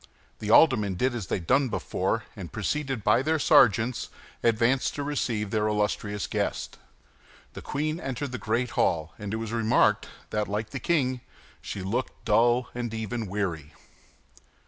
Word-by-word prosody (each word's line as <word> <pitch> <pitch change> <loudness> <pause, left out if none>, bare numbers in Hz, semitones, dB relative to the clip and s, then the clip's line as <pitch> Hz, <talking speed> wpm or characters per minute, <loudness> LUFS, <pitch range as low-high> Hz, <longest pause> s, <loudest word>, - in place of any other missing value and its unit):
The 105 - -4
aldermen 110 - +5
did 125 +7 +1
as 110 -6 -4
they - - 0
had 90 - -5
done 135 +6 +3
before, 110 0 -1
and 90 -6 -8
preceded 135 - -2
by 105 +4 +4
their 160 +3 +1
sergeants, 115 -3 +4 0.3
advanced 115 +3 +2
to 145 - -3
receive 115 -8 -2
their 110 -1 +1
illustrious 105 -1 -1
guest. - - -3 0.7
The - - -8
queen 155 +3 -2
entered 135 -1 -4
the 125 - -4
great 115 +2 -1
hall; 80 -1 0
and 105 -1 -5
it 110 - -1
was 115 -1 -5
remarked 115 -1 +3 0.2
that, 105 -1 0
like 105 +1 -3
the - - -4
king, 130 -7 0 0.4
she 95 - -5
looked 115 +7 -3
dull 120 +3 +3
and 120 -2 -3
even 110 0 -3
weary. 90 -7 -3
115 Hz, 160 wpm, -27 LUFS, 105-125 Hz, 0.7 s, aldermen